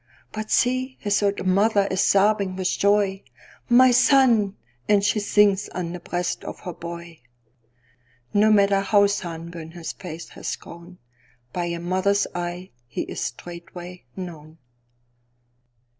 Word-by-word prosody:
But 215 0 -5
see, 255 +1 +1
his 205 0 +1
old 200 -1 0
mother 200 +2 +3
is 190 0 +1
sobbing 200 -1 +3
with 185 -1 -1
joy:"My 205 +5 +2
son!"—And 210 - +3
she 205 +1 +2
sinks 205 -1 +3
on 175 -2 -3
the 180 - -6
breast 175 +1 -3
of - - -8
her 180 - -6
boy.No 120 - -5
matter 200 -1 +4
how 200 0 +4
sunburnt 170 -4 -4
his 170 -2 -6
face 170 -3 -8
has - - -5
grown, 170 +2 -13 0.6
By 175 -1 -1
a 170 0 -3
mother's 190 +3 +1
eye 175 +1 -5 0.2
he 120 - -4
is - - -6
straightway 175 +1 -8
known. 160 -4 -9
185 Hz, 125 wpm, -24 LUFS, 170-205 Hz, 0.6 s, matter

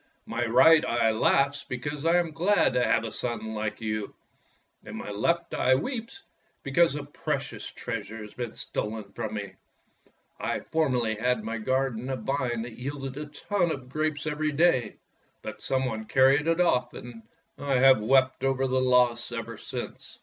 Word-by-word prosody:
My 115 +1 -2
right 160 +7 +6
eye 115 -1 +2
laughs 135 +5 +2
because 145 +5 -4
I 170 +1 +5
am 170 -2 0
glad 180 +6 +2
to 125 - +2
have - - +2
a 115 - -4
son 110 -1 -3
like 105 -1 -3
you, 110 -2 -3 0.7
and - - -8
my - - -6
left 170 +12 0
eye 130 - +3
weeps 235 - -4 0.4
because 155 +3 +3
a 145 - -4
precious 145 - -4
treasure 110 -2 -6
has 105 -1 -9
been 120 -2 -5
stolen 105 -2 -4
from 110 -2 -4
me. 100 -2 -5 0.9
I - - -2
formerly 130 -8 0
had 125 +3 +1
in - - -11
my 115 0 -3
garden 130 0 -1
a 135 - -1
vine 120 -1 -2
that 120 -1 -9
yielded 135 0 -5
a 150 +1 -5
ton 175 +4 -1
of 130 -4 -6
grapes 155 +1 -2
every 150 0 -1
day, 145 -5 +2 0.5
but - - -7
some 130 0 0
one 110 -3 -3
carried 135 +5 +4
it 165 +1 +2
off, 170 -8 +2
and 120 -2 -9 0.4
I 140 -1 0
have 130 -2 +6
wept 130 +3 +3
over 135 0 +1
its 130 - 0
loss 125 -2 +3
ever 115 -1 -5
since. - - -7
130 Hz, 175 wpm, -27 LUFS, 115-145 Hz, 0.9 s, right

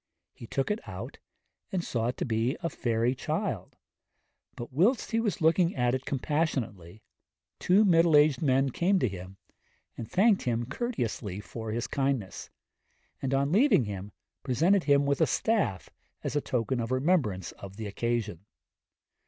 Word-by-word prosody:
He 115 - -11
took 135 - -1
it 210 - -1
out - - -7 0.5
and 185 -2 -1
saw 115 -6 -1
it 125 - -3
to - - -2
be 115 +3 0
a 170 - -1
fairy 115 0 0
child, - - -3 0.8
but 120 +2 -8
whilst 210 - +2
he 225 - +2
was 210 -4 -1
looking 165 +2 +3
at 125 -1 +1
it 130 0 -2
compassionately, 125 - -2 0.6
two 200 +4 +4
middle 165 -3 +5
aged 145 -3 +4
men 135 -2 +2
came 190 +8 +2
to 145 - +1
him 95 -1 -8 0.6
and 115 -1 -7
thanked 200 +1 +3
him 120 -1 -1
courteously 120 - -3
for 110 +4 -7
his 115 +1 -2
kindness, 135 -8 -2 0.7
and 135 - -2
on 140 +1 +1
leaving 220 - +4
him 100 0 -6 0.3
presented 170 +9 +2
him 140 -1 +4
with 140 +2 0
a 160 - +5
staff 200 - 0 0.3
as - - -3
a 145 - +2
token 125 0 -1
of 115 -1 -2
remembrance 130 - +1
of 100 -1 -11
the 110 +1 -6
occasion. 105 -3 -3
130 Hz, 160 wpm, -28 LUFS, 115-165 Hz, 0.8 s, middle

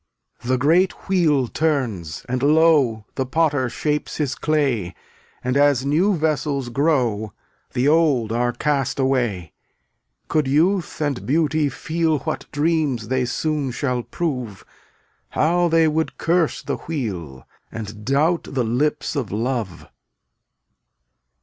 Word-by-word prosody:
The 130 +1 +1
great 170 +8 +2
wheel 155 -9 +2
turns, 115 - -2
and 125 0 -2
lo! 150 -3 +4
(^flt/lt* 110 -1 -11
The 130 - -2
Potter 145 -3 +1
shapes 150 +5 -2
his 145 -4 -1
clay. 135 - 0 0.5
And 125 +1 -1
as 140 -2 +3
new 175 +8 +2
vessels 150 -4 -1
grow, 120 - 0 0.4
v£^' - - -36
The 125 +3 +1
old 145 -8 +3
are 120 +1 +1
cast 140 0 -1
away. 120 - 0
ftUYkfi' - - -49
Could 150 -3 +1
youth 165 +5 +1
and 145 -4 -1
beauty 155 +1 +2
feel 160 +3 -1
3 - - -10
What 155 - -4
dreams 145 -7 0
they 130 -1 +1
soon 150 +2 -1
shall 125 0 -1
prove. 125 - -4 0.6
How 175 +3 +2
they 165 -1 +4
would 160 +1 -1
curse 170 -1 +1
the - - -3
Wheel 90 - -5 0.3
And 105 -1 -7
doubt 150 +8 +1
the 130 -3 -1
lips 125 +8 -1
of 130 -8 -2
Love. 110 -4 -3
140 Hz, 135 wpm, -22 LUFS, 120-155 Hz, 0.6 s, lo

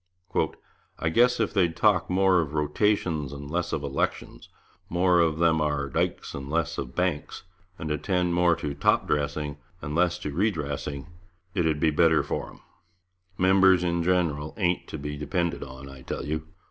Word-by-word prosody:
'I 80 - 0
guess 120 +8 +3
if 110 - 0
they'd 90 -5 +2
talk 95 -5 +3
more 95 -1 +4
of 75 -1 -5
rotations 75 -1 0
and 70 0 -8
less 85 +1 -1
of 75 - -2
elections, 70 -1 -3 0.4
more 90 0 +3
of 80 -2 +2
them 80 -1 +3
ar 75 -2 0
dykes - - -2
and 70 0 -6
less 80 -1 -1
of 65 - -6
banks, 90 -5 -2 0.3
and 80 -1 -4
attend 90 +2 0
more 85 -1 +4
to 75 - -4
top - - +2
dressing 75 0 -1 0.2
and 75 - -5
less 85 +1 +2
to 75 - -5
re 95 +10 +2
dressing, 70 -4 -4 0.5
it 85 -5 +1
'ed 75 -2 0
be 80 0 +3
better 80 +1 +4
for - - -4
'em.... - - -16 0.8
Members 95 -1 +5
in 85 -1 0
general 85 -4 0
ain't 90 -4 0
to - - -6
be 75 0 -5
depended 85 +3 -1
on, 65 +1 -10
I 65 -1 -11
tell 65 - -5
you. 80 +1 -3
80 Hz, 175 wpm, -26 LUFS, 75-90 Hz, 0.8 s, Members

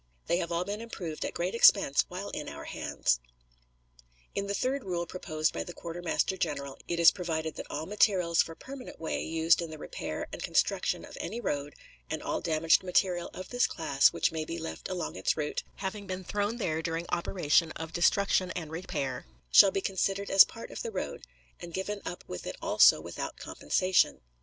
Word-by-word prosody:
They 170 - +2
have 170 -1 -2
all 170 +1 0
been 205 +3 -4
improved 175 -9 -5
at - - -4
great 175 +2 -1
expense 200 -10 +6
while 185 +3 -6
in 150 - -5
our - - -8
hands. - - 0 1.1
In 200 0 -2
the 200 - -1
third 260 +5 -1
rule 175 -2 -2
proposed 155 -3 -2
by - - -2
the 175 - -9
quartermaster 175 +2 -2
general 140 -5 -3
it 170 - -1
is 170 - +9
provided 160 -4 -3
that - - -8
all 150 +2 -3
materials 185 -4 +3
for 165 - -5
permanent 265 +4 -10
way 160 - -2
used 165 +1 +3
in 170 - -4
the 155 - -8
repair - - -5
and - - -6
construction - - +1
of - - -11
any 235 - -4
road, 145 -8 -3 0.3
and - - -3
all - - -2
damaged 160 0 +3
material 180 -1 +1
of 185 - -7
this 245 0 +2
class 140 -4 +3
which - - +1
may 160 -1 -2
be 165 +2 -5
left 165 0 -6
along 185 -2 -3
its 95 - 0
route, 150 -1 -2
having 200 +1 -5
been 185 0 -4
thrown 205 +4 -1
there 160 -8 -1
during 165 +1 -2
operation 170 -2 +2
of 160 0 -7
destruction 185 +1 +3
and 160 -3 -5
repair, 160 - -4 0.2
shall 195 - +9
be 195 - -1
considered 195 +1 -1
as 195 - +10
part 230 - -9
of - - -6
the 470 - -3
road, - - -5 0.3
and 170 -1 -8
given 200 +2 -3
up 175 - -6
with 90 - -6
it - - -4
also - - +6
without - - -6
compensation. 185 - +1
175 Hz, 195 wpm, -30 LUFS, 160-195 Hz, 1.1 s, as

